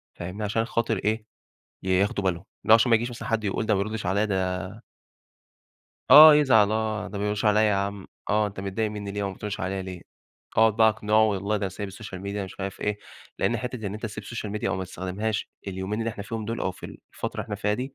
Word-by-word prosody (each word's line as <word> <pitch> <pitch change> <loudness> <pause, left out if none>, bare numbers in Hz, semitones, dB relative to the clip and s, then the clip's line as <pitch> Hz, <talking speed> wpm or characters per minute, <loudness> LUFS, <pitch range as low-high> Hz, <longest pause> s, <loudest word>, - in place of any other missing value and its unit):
فاهمني، 90 +5 -6
عشان 110 +2 0
خاطر 115 -2 0
إيه، 110 +2 -1 0.6
ياخدوا 95 +1 +1
بالهم. 90 -1 -1 0.2
اللي 110 - +4
هو - - +12
عشان 115 +2 +4
ما 115 - +7
ييجيش 120 +2 -3
مثلًا 115 -2 -7
حد 115 -1 0
يقول 105 +2 -1
ده 105 - +3
ما 95 - +1
بيرُدش 110 -1 -4
عليّا 100 +4 +2
ده 95 -2 -2 1.3
آه، 150 +2 +11
يزعل 110 -8 +5
آه. 110 -1 -1
"ده 100 - -6
ما 100 - -2
بيرُدش 105 +1 -1
عليّا 105 0 +4
يا 105 -2 +3
عَم،" 100 0 -3 0.2
آه، 105 0 +3
"أنت 100 -1 -6
متضايق 100 +3 -2
منّي 100 -1 -5
ليه 100 0 -3
وما 100 -1 -3
بترُدش 105 +1 -5
عليّا 95 0 -2
ليه؟" 90 -2 -7 0.6
أقعد 110 -1 +5
بقى 110 -1 +6
أقنعه 110 0 +2
"والله 100 0 0
ده 105 - -5
أنا 100 - 0
سايب 100 +2 -6
السوشيال 95 -1 -8
ميديا،" 100 +1 -3
مش 95 - -11
عارف 95 0 -5
إيه، 105 0 -1 0.4
لإن 120 - +1
حتّة 120 -2 -5
إن 100 - -4
أنت 110 - -8
تسيب 105 0 -7
السوشيال 110 -3 -5
ميديا 105 -2 -2
أو 95 - -1
ما 95 - -3
تستخدمهاش 95 +4 -3 0.2
اليومين 95 +2 -3
اللي 115 - -1
إحنا 105 -2 -7
فيهم 110 +1 -4
دول 115 +2 -4
أو - - 0
في 90 - -9
الفترة - - -7
اللي - - -4
إحنا - - -5
فيها 105 +1 0
دي، 130 +4 -5
105 Hz, 235 wpm, -26 LUFS, 100-110 Hz, 1.3 s, هو